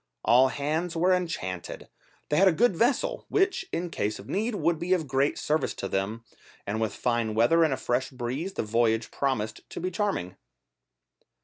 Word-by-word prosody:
All 125 Hz, +2 st, +6 dB
hands 155 Hz, +6 st, -2 dB
were 180 Hz, +3 st, +3 dB
enchanted, 165 Hz, -, -3 dB, 0.4 s
they 150 Hz, -, +1 dB
had 195 Hz, +3 st, +6 dB
a -, -, +6 dB
good 205 Hz, +3 st, +3 dB
vessel, 240 Hz, +8 st, 0 dB
which, 390 Hz, -1 st, +1 dB
in 175 Hz, 0 st, -3 dB
case 105 Hz, -5 st, -2 dB
of 100 Hz, -, -11 dB
need, 220 Hz, +4 st, -1 dB
would 170 Hz, -5 st, +1 dB
be 175 Hz, +2 st, +1 dB
of 170 Hz, -4 st, 0 dB
great 135 Hz, +2 st, +1 dB
service 155 Hz, +1 st, 0 dB
to 95 Hz, -, -4 dB
them, 100 Hz, +4 st, -2 dB, 0.4 s
and 110 Hz, +2 st, -2 dB
with 110 Hz, -3 st, -1 dB
fine 115 Hz, -3 st, 0 dB
weather 140 Hz, +10 st, +4 dB
and 155 Hz, -, +2 dB
a 130 Hz, -, 0 dB
fresh 125 Hz, +2 st, -1 dB
breeze 130 Hz, +9 st, -4 dB
the -, -, -2 dB
voyage 115 Hz, 0 st, +1 dB
promised 120 Hz, -6 st, -2 dB
to -, -, -6 dB
be 185 Hz, +2 st, -2 dB
charming. 185 Hz, -, -2 dB
140 Hz, 185 wpm, -27 LUFS, 115-180 Hz, 0.4 s, All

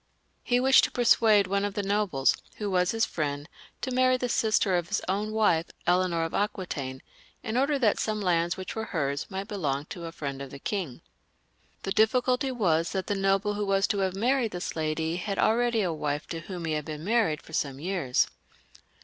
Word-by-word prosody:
He 245 Hz, 0 st, +1 dB
wished, 265 Hz, +1 st, +6 dB
to -, -, -5 dB
persuade 225 Hz, -4 st, +4 dB
one 200 Hz, +2 st, 0 dB
of 205 Hz, -1 st, -2 dB
the 205 Hz, -, -1 dB
nobles, 195 Hz, -9 st, +2 dB, 0.2 s
who 205 Hz, -2 st, -3 dB
was 180 Hz, -1 st, +2 dB
his 225 Hz, 0 st, +2 dB
friend, 145 Hz, -2 st, -3 dB, 0.3 s
to 260 Hz, -, -3 dB
marry 255 Hz, 0 st, +4 dB
the 250 Hz, -1 st, -2 dB
sister 215 Hz, -4 st, +2 dB
of 175 Hz, -1 st, -1 dB
his -, -, 0 dB
own 205 Hz, +3 st, -1 dB
wife, 205 Hz, -7 st, +2 dB, 0.2 s
Eleanor 175 Hz, -1 st, +2 dB
of 165 Hz, -, -4 dB
Aquitaine, 150 Hz, -10 st, -3 dB, 0.4 s
in 220 Hz, -, -3 dB
order 280 Hz, +3 st, +2 dB
that 230 Hz, -6 st, +2 dB
some 215 Hz, -1 st, -1 dB
lands 175 Hz, -3 st, +1 dB
which 185 Hz, -1 st, -6 dB
were 220 Hz, 0 st, -3 dB
hers 140 Hz, -7 st, -2 dB
might 195 Hz, +1 st, -5 dB
belong 145 Hz, -9 st, -2 dB
to 175 Hz, -3 st, -7 dB
a 165 Hz, -, -6 dB
friend 140 Hz, -4 st, -5 dB
of 140 Hz, -, -6 dB
the 140 Hz, -, -9 dB
king. 170 Hz, -, -4 dB, 0.8 s
The 195 Hz, -, -3 dB
difficulty 250 Hz, +5 st, +2 dB
was 170 Hz, -9 st, +1 dB
that 190 Hz, -1 st, -2 dB
the -, -, -1 dB
noble 195 Hz, +1 st, +1 dB
who 205 Hz, 0 st, -2 dB
was 195 Hz, 0 st, +3 dB
to 205 Hz, -, 0 dB
have 190 Hz, -1 st, 0 dB
married 240 Hz, +2 st, +1 dB
this 180 Hz, -, -4 dB
lady 160 Hz, +1 st, -1 dB
had 195 Hz, +2 st, -3 dB
already 230 Hz, 0 st, +2 dB
a 175 Hz, -3 st, 0 dB
wife 150 Hz, -1 st, -2 dB
to 165 Hz, -, -4 dB
whom 175 Hz, 0 st, -6 dB
he 160 Hz, -, -1 dB
had 150 Hz, -1 st, -2 dB
been 155 Hz, -1 st, -6 dB
married 205 Hz, -7 st, +1 dB
for 160 Hz, -, -15 dB
some 140 Hz, -3 st, -1 dB
years. 170 Hz, -7 st, +1 dB
195 Hz, 205 wpm, -27 LUFS, 160-215 Hz, 0.8 s, wished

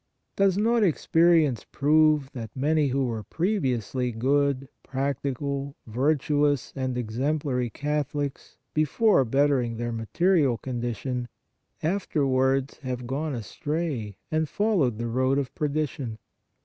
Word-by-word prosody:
Does 195 Hz, -1 st, +3 dB
not 230 Hz, +2 st, +3 dB
experience 165 Hz, -, +3 dB
prove 150 Hz, -1 st, +3 dB
that 115 Hz, -4 st, -6 dB
many 150 Hz, +2 st, +2 dB
who 135 Hz, 0 st, +1 dB
were 115 Hz, -3 st, -3 dB
previously 130 Hz, -, -1 dB
good, 135 Hz, +3 st, +1 dB
practical, 140 Hz, +1 st, -3 dB
virtuous 145 Hz, +2 st, +1 dB
and 130 Hz, -2 st, -2 dB
exemplary 125 Hz, +2 st, -1 dB
Catholics 145 Hz, +1 st, -3 dB, 0.2 s
before 155 Hz, +4 st, +3 dB
bettering 130 Hz, -2 st, +1 dB
their 120 Hz, 0 st, -2 dB
material 130 Hz, -, +2 dB
condition, 120 Hz, 0 st, -3 dB, 0.6 s
afterwards 135 Hz, -6 st, +1 dB
have 125 Hz, -3 st, -4 dB
gone 140 Hz, +3 st, -2 dB
astray 120 Hz, -, -3 dB
and 155 Hz, -1 st, 0 dB
followed 185 Hz, -, +1 dB
the 120 Hz, -, -3 dB
road 130 Hz, +3 st, +1 dB
of 135 Hz, -2 st, -2 dB
perdition? 145 Hz, -6 st, -2 dB
140 Hz, 110 wpm, -26 LUFS, 125-155 Hz, 0.6 s, Does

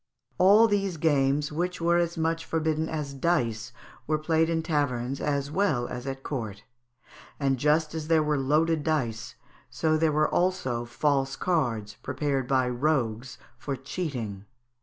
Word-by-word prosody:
All 205 Hz, +5 st, +7 dB
these 195 Hz, -4 st, 0 dB
games, 145 Hz, -1 st, +2 dB
which 180 Hz, +4 st, -2 dB
were 170 Hz, +1 st, +3 dB
as 170 Hz, 0 st, -1 dB
much 165 Hz, 0 st, 0 dB
forbidden 160 Hz, -1 st, -1 dB
as 150 Hz, -3 st, -4 dB
dice, 125 Hz, -6 st, 0 dB, 0.4 s
were 155 Hz, 0 st, +2 dB
played 160 Hz, +1 st, +1 dB
in 165 Hz, -1 st, 0 dB
taverns 135 Hz, -5 st, -1 dB
as 140 Hz, -1 st, -1 dB
well 155 Hz, -9 st, +1 dB
as 125 Hz, +2 st, -6 dB
at 135 Hz, 0 st, -5 dB
court; 110 Hz, -7 st, -5 dB, 0.8 s
and, 135 Hz, -2 st, +1 dB
just 155 Hz, +2 st, +2 dB
as 160 Hz, -1 st, -4 dB
there 160 Hz, -1 st, +4 dB
were 150 Hz, -1 st, 0 dB
loaded 155 Hz, +3 st, +2 dB
dice, 125 Hz, -8 st, -2 dB, 0.3 s
so 160 Hz, -, -1 dB
were 155 Hz, -, +4 dB
there 155 Hz, -1 st, +3 dB
also 155 Hz, -10 st, 0 dB
false 135 Hz, +2 st, 0 dB
cards, 115 Hz, -, -1 dB
prepared 140 Hz, -4 st, -2 dB
by 130 Hz, -1 st, +2 dB
rogues 125 Hz, -2 st, -1 dB, 0.2 s
for 140 Hz, 0 st, -3 dB
cheating. 125 Hz, -, -5 dB
150 Hz, 150 wpm, -27 LUFS, 130-160 Hz, 0.8 s, All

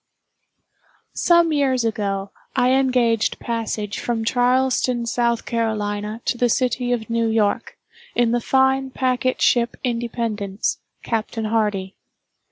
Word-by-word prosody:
Some 340 Hz, -2 st, +3 dB
years 265 Hz, -4 st, +1 dB
ago, 200 Hz, -3 st, -2 dB, 0.2 s
I 250 Hz, +1 st, +3 dB
engaged 250 Hz, -4 st, +2 dB
passage 225 Hz, -3 st, -3 dB
from 230 Hz, -2 st, -2 dB
Charleston, 250 Hz, 0 st, +2 dB
S. 235 Hz, -, -3 dB
C., 235 Hz, -1 st, 0 dB
to 215 Hz, +1 st, -2 dB
the 245 Hz, -, +3 dB
city 245 Hz, +1 st, 0 dB
of 230 Hz, -3 st, -1 dB
New 230 Hz, 0 st, 0 dB
York, 220 Hz, -2 st, 0 dB, 0.4 s
in 240 Hz, -1 st, +3 dB
the 240 Hz, 0 st, +1 dB
fine 265 Hz, +1 st, +2 dB
packet 255 Hz, 0 st, 0 dB
ship 235 Hz, -1 st, +3 dB
"Independence," 230 Hz, -4 st, -2 dB, 0.2 s
Captain 225 Hz, -1 st, -2 dB
Hardy. 210 Hz, -3 st, -1 dB
235 Hz, 115 wpm, -21 LUFS, 220-250 Hz, 0.4 s, Some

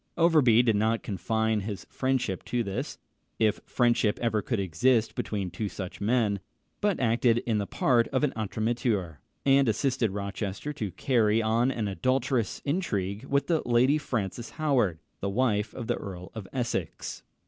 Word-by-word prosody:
Overbury 150 Hz, -9 st, +5 dB
did 115 Hz, -3 st, +3 dB
not 110 Hz, +2 st, +1 dB
confine 110 Hz, +2 st, 0 dB
his 100 Hz, 0 st, -5 dB
friendship 130 Hz, -8 st, -1 dB
to 120 Hz, -1 st, 0 dB
this 100 Hz, -2 st, -4 dB, 0.4 s
if 110 Hz, -2 st, +2 dB
friendship 120 Hz, -4 st, +2 dB
ever 115 Hz, -3 st, +1 dB
could 115 Hz, -1 st, -2 dB
exist 110 Hz, +6 st, +2 dB
between 100 Hz, -4 st, -3 dB
two 100 Hz, +4 st, -3 dB
such 95 Hz, -2 st, -7 dB
men 105 Hz, -2 st, +2 dB, 0.4 s
but 205 Hz, -2 st, +1 dB
acted 115 Hz, 0 st, +2 dB
the 105 Hz, -4 st, 0 dB
part 120 Hz, -3 st, +2 dB
of 135 Hz, +1 st, -1 dB
an 145 Hz, -, +2 dB
entremetteur, 110 Hz, -, -1 dB, 0.3 s
and 135 Hz, -2 st, +5 dB
assisted 125 Hz, +1 st, +1 dB
Rochester 100 Hz, +6 st, -4 dB
to 110 Hz, -7 st, -3 dB
carry 110 Hz, 0 st, +2 dB
on 115 Hz, +3 st, +2 dB
an 115 Hz, -5 st, -2 dB
adulterous 125 Hz, +1 st, 0 dB
intrigue 105 Hz, -, -1 dB
with 140 Hz, +1 st, +1 dB
the 165 Hz, -3 st, +1 dB
Lady 125 Hz, +5 st, +3 dB
Frances 115 Hz, -5 st, -3 dB
Howard, 130 Hz, -, +2 dB, 0.2 s
the 100 Hz, -, -2 dB
wife 105 Hz, -1 st, +1 dB
of 120 Hz, -, -6 dB
the -, -, 0 dB
Earl 90 Hz, -2 st, -8 dB
of 110 Hz, -4 st, -7 dB
Essex. 120 Hz, -10 st, -3 dB
115 Hz, 155 wpm, -28 LUFS, 100-130 Hz, 0.4 s, Overbury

